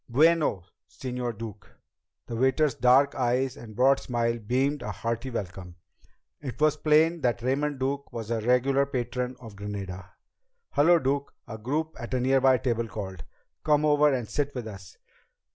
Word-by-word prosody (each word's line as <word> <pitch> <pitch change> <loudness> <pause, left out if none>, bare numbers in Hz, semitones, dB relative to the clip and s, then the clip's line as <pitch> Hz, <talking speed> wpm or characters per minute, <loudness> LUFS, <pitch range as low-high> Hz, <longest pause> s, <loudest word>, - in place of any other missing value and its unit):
"Bueno, 150 - +3 0.3
Señor 125 -3 -4
Duke!" 110 -3 -8 0.6
The 115 - -6
waiter's 130 +4 +2
dark 130 +3 +4
eyes 125 +1 0
and 110 -3 -11
broad 135 +3 +4
smile 120 -1 -1
beamed 130 +6 0
a 105 - -4
hearty 115 +5 -3
welcome. 90 -6 -6 0.7
It 135 -4 -6
was 155 0 +4
plain 155 +2 +3
that 120 -2 0
Raymond 140 +3 0
Duke 140 +2 -2
was 115 -1 -6
a 115 -1 0
regular 130 +4 +2
patron 125 -1 -3
of 115 -3 -10
the - - -17
Granada. 95 -3 -6 0.6
"Hello, 170 +4 +5
Duke!" 140 -1 -1 0.2
a 110 -3 -7
group 150 +8 -2
at 120 +1 -4
a - - +1
nearby 130 0 +4
table 115 -2 -1
called. 95 -5 -6 0.4
"Come 150 -1 +3
over 150 0 +4
and 125 -4 -1
sit 145 +2 -2
with 120 -3 -4
us." 95 -3 -11
125 Hz, 160 wpm, -27 LUFS, 115-140 Hz, 0.7 s, Hello